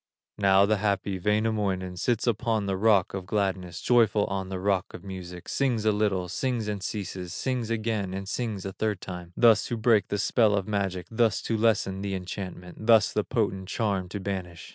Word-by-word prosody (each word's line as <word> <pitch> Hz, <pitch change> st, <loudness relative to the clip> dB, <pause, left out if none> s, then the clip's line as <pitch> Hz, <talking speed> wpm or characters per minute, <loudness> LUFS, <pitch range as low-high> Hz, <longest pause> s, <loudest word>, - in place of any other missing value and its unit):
Now 100 Hz, 0 st, +5 dB
the 105 Hz, +1 st, +2 dB
happy 100 Hz, -2 st, -1 dB
Wainamoinen, 105 Hz, -2 st, 0 dB
Sits 110 Hz, +6 st, 0 dB
upon 110 Hz, -2 st, 0 dB
the 95 Hz, -1 st, -1 dB
rock 100 Hz, -2 st, +3 dB
of 95 Hz, -2 st, -5 dB
gladness, 95 Hz, -3 st, -1 dB
Joyful 110 Hz, -4 st, +3 dB
on 95 Hz, -1 st, -3 dB
the 95 Hz, -1 st, -4 dB
rock 95 Hz, -1 st, 0 dB
of 85 Hz, -, -10 dB
music, 90 Hz, -2 st, -8 dB
Sings 125 Hz, -6 st, 0 dB
a 110 Hz, -, +5 dB
little, 100 Hz, -4 st, 0 dB
sings 120 Hz, +4 st, -2 dB
and 105 Hz, -2 st, -3 dB
ceases, 90 Hz, -3 st, -5 dB
Sings 125 Hz, 0 st, -2 dB
again, 110 Hz, -4 st, -1 dB
and 95 Hz, +1 st, -5 dB
sings 110 Hz, -3 st, -3 dB
a 95 Hz, -, -4 dB
third 105 Hz, -2 st, -1 dB
time, 90 Hz, -2 st, -8 dB
Thus 115 Hz, -3 st, +5 dB
to 120 Hz, -, -2 dB
break 110 Hz, -2 st, +3 dB
the 100 Hz, -, -2 dB
spell 110 Hz, 0 st, +3 dB
of 95 Hz, -2 st, -1 dB
magic, 95 Hz, -4 st, -1 dB
Thus 115 Hz, -1 st, +2 dB
to 115 Hz, -, -1 dB
lessen 105 Hz, -4 st, +1 dB
the 100 Hz, -1 st, -2 dB
enchantment, 90 Hz, +1 st, -7 dB
Thus 115 Hz, -3 st, +5 dB
the -, -, +1 dB
potent 95 Hz, -1 st, -1 dB
charm 100 Hz, -6 st, -1 dB
to 100 Hz, -, -5 dB
banish. 95 Hz, -3 st, -5 dB
100 Hz, 190 wpm, -27 LUFS, 95-110 Hz, -, Now